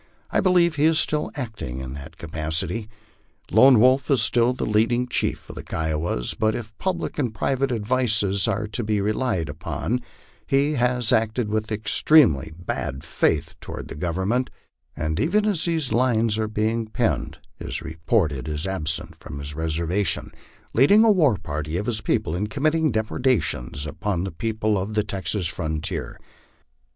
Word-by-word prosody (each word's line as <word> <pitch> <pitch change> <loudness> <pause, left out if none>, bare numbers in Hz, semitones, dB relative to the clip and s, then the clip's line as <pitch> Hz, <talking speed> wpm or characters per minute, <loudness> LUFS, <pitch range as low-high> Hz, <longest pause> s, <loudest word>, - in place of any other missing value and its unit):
I - - +2
believe 175 -4 +3
he 145 - +3
is 160 0 +4
still 150 0 0
acting 110 - -5
in 65 0 -6
that 70 -1 -10
capacity. 85 +7 -3 0.6
Lone 125 +4 +7
Wolf 130 +3 +4
is 135 -6 +3
still 120 +1 +3
the 125 - -3
leading 115 +3 +2
chief 125 - -1
of - - -8
the - - -6
Kiowas; 80 -5 -2
but 110 0 +1
if 110 -2 -7
public 180 -4 -2
and 125 -6 0
private 135 +3 0
advices 110 -3 +1
are 105 0 0
to 110 +2 -3
be 105 -1 0
relied 105 - 0
upon, 80 - -3 0.5
he 140 +1 +2
has 125 -3 +1
acted 110 0 +1
with 110 +1 -2
extremely 105 - +3
bad 70 -6 -4
faith 80 +2 0
toward - - -7
the - - -7
Government, 95 - -1 0.5
and 80 +1 -2
even 200 - +2
as 200 -7 +1
these 160 -6 0
Unes 115 -3 +2
are 110 - 0
being 110 +1 -1
penned 115 +1 -1 0.2
is - - -5
reported 80 - -1
as 75 +3 -2
absent 80 -4 -2
from - - -8
his 70 +1 -4
reservation, 80 +4 -1 0.4
leading 200 - +6
a 225 - +6
war 150 - +4
party 75 +1 -4
of 100 - -2
his 110 -2 -1
people 80 - 0
in 100 +4 -1
committing 155 +5 +1
depredations 105 - 0
upon 90 +3 -2
the 95 - -4
people 110 +3 -1
of 100 +3 -4
the 105 - +2
Texas 100 -1 -3
fron 80 -2 -2
tier. - - -3
110 Hz, 160 wpm, -24 LUFS, 80-125 Hz, 0.6 s, Lone